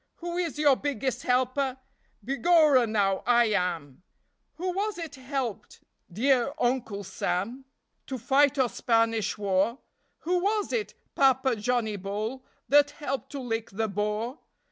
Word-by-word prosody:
Who 345 0 -5
is 345 -4 -2
your 290 -3 +5
biggest 265 -2 -2
helper? 255 +1 0 0.5
Begorra, 275 -1 +4
now, 195 -3 +1
I 240 -2 +4
am! 175 -8 -2 0.5
Who 365 +2 -2
was 405 +2 -2
it 330 -3 -6
helped, 260 -4 -5 0.3
dear 255 +6 +2
Uncle 240 -5 -1
Sam, 200 +7 -3 0.4
To 265 - -4
fight 280 +4 +3
your 260 -3 +3
Spanish 225 -3 +1
War? 200 +3 +1 0.4
Who 360 +2 +1
was 415 +3 0
it, 440 -4 -2 0.2
Papa 265 -2 +3
Johnnie 220 -1 -1
Bull, 210 +7 -4 0.2
That 290 +1 +5
helped 275 -2 -4
to 280 - -4
lick 225 -2 -3
the 220 +3 -2
Boer? 210 - -2
255 Hz, 135 wpm, -27 LUFS, 215-285 Hz, 0.5 s, your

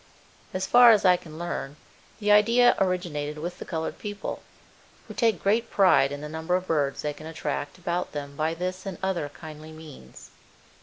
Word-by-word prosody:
As 185 0 -2
far 245 +2 +7
as 210 -3 +3
I 180 -1 +7
can 160 -3 -10
learn, 160 -4 -4 0.4
the 210 -1 +1
idea 230 +4 +5
originated 170 -6 -1
with 175 +4 -6
the - - -7
colored 160 -2 -4
people, 205 -1 -5 0.7
who - - -8
take 225 -7 +1
great 220 +4 +1
pride 180 -8 +4
in 145 0 -6
the 150 - -5
number 160 +3 -2
of 185 0 -1
birds 145 -5 -1
they 150 0 -2
can 155 +2 -11
attract 155 -1 -4
about 175 0 -3
them 140 -1 -6
by 155 +2 -1
this 185 +2 -4
and 190 -3 -5
other 180 -6 -1
kindly 155 +1 -11
means. 155 - -13
170 Hz, 185 wpm, -26 LUFS, 150-190 Hz, 0.7 s, far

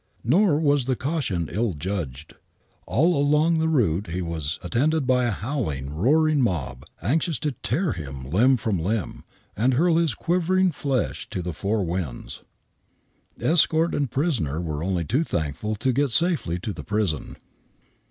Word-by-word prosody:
Nor 160 - +3
was 145 -4 +2
the 130 0 0
caution 120 - -2
ill 110 -2 0
judged. 75 -4 -5 0.5
All 165 +8 +3
along 150 +3 +3
the 160 - +1
route 105 - +1
he 85 +2 -3
was 80 -2 -3
attended 140 - +1
by 125 -1 +2
a - - +1
howling, 95 - -3
roaring 150 - +3
mob, 75 - -2 0.2
anxious 160 - +1
to 150 +1 -2
tear 130 - -1
him 70 - -7
limb 125 +9 +4
from 110 -6 -1
limb, 100 +4 -2 0.3
and 125 +5 +2
hurl 165 +4 +3
his 165 -8 +1
quivering 180 +2 +1
flash 135 -5 -2
to 95 -5 -4
the 90 0 -4
four 100 +5 -1
winds. 85 -7 -4 1.0
Escort 165 0 +3
and 140 -3 0
prisoner 115 - -1
were 80 -3 -3
only 90 -2 -1
too 130 - +1
thankful 85 - -3
to 125 +5 0
get 140 +2 +1
safely 155 - +2
to 105 - -4
the - - -8
prison. 105 -8 -2
115 Hz, 155 wpm, -24 LUFS, -, 1.0 s, limb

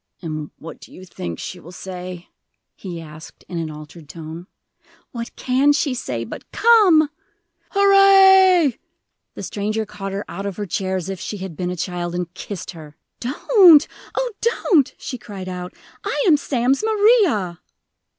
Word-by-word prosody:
"And 155 -3 -5
what 165 - -10
do - - -15
you 185 - -12
think 85 - -6
she 180 - -7
will 170 +1 -13
say?" 180 -1 -8 0.5
he 175 -4 -7
asked, 155 -1 -12
in 175 - -4
an 160 -1 -3
altered 150 0 -11
tone. 165 +2 -9 0.6
"What 235 -1 -7
can 265 +3 +2
she 285 -2 0
say 125 - -4
but 115 - -10
Come!" 410 -9 +5 0.6
"Hurrah!" 385 -4 +6 0.6
The - - -7
stranger 215 +2 -2
caught 200 -2 -7
her 200 +1 -4
out 195 +4 -5
of 195 - -6
her 205 - -3
chair 190 +1 -2
as 185 -2 -3
if 195 -2 -5
she 210 - -5
had 190 -4 -7
been 180 +3 -3
a 180 - -3
child, 175 0 -4
and 175 -1 -4
kissed 190 0 -7
her. 155 -3 -13 0.2
"Don't 315 - +5 0.3
oh, - - -1
don't!" 370 - +2
she 255 - -6
cried 195 -4 -8
out. 180 -1 -6 0.3
"I - - -1
am 325 - +7
Sam's 270 - 0
Maria!" 410 - +2
195 Hz, 160 wpm, -21 LUFS, -, 0.6 s, am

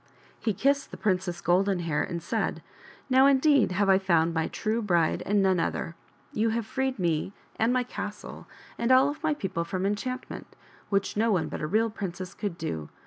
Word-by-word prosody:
He 220 - 0
kissed 280 +5 +1
the - - -9
Princess 185 -4 -1
Golden 185 +1 +2
Hair 160 -3 0
and 170 -2 -5
said - - -2
' - - -20
" - - -28
Now, 260 +1 +6
indeed, 280 -6 +4
have 200 +1 +1
I 190 -1 +5
found 170 -3 +2
my 160 -1 0
true 225 +1 -2
bride 175 -6 +1
and 205 0 +3
none 190 -2 +3
other. 165 0 -2 0.4
You 220 +1 +1
have 225 0 -1
freed 265 +2 -2
me 170 +1 -1 0.2
and 225 +2 +2
my 250 0 +2
castle 210 -4 -7 0.3
and 235 +2 +1
all 260 +2 +6
of 295 +1 -6
my 310 -1 +1
people 185 - -3
from 185 +3 -3
enchantment, 255 +6 -4 0.3
which 200 -1 0
no 225 +2 +2
one 185 -5 +1
but - - -5
a 155 - -1
real 220 +6 +1
princess 185 -3 -6
could 200 -6 -4
do. 80 - -4
200 Hz, 200 wpm, -27 LUFS, 175-235 Hz, 0.4 s, Now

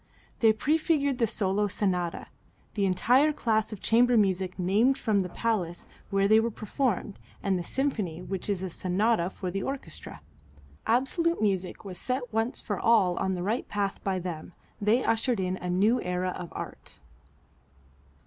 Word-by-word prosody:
They 225 -2 +6
prefigured 285 +2 +1
the 230 - +3
solo 205 -1 0
sonata, 180 -4 -1 0.5
the 200 -2 +1
entire 245 +11 +4
class 220 -7 0
of 215 - -7
chamber 240 +1 +4
music 190 -3 +1
named 210 +9 +3
from 215 -3 +1
the 180 - -4
place 180 -5 -2 0.2
where 195 0 +2
they 215 +2 +6
were 230 +1 +1
performed, 220 -2 -2 0.2
and 195 -1 +1
the - - -4
symphony 210 - -2
which 190 +2 -4
is 190 -2 -1
a 185 - -4
sonata 185 +1 +1
for 185 -1 -5
the 195 +2 -2
orchestra. 175 - -6 0.7
Absolute 335 +8 +2
music 195 -1 -1
was 185 -3 -7
set 250 -2 -3
once 225 +2 0
for 205 -3 -3
all 195 -6 +4
on 190 - 0
the 175 -1 -3
right 220 +6 -1
path 200 -1 -2
by 195 -1 0
them. 175 -2 -6 0.3
They 220 +5 +3
ushered 230 0 +1
in 185 0 -1
a 180 - -5
new 205 +7 +3
era 180 +1 -1
of 175 - -6
Art. - - -8
205 Hz, 165 wpm, -28 LUFS, 185-235 Hz, 0.7 s, They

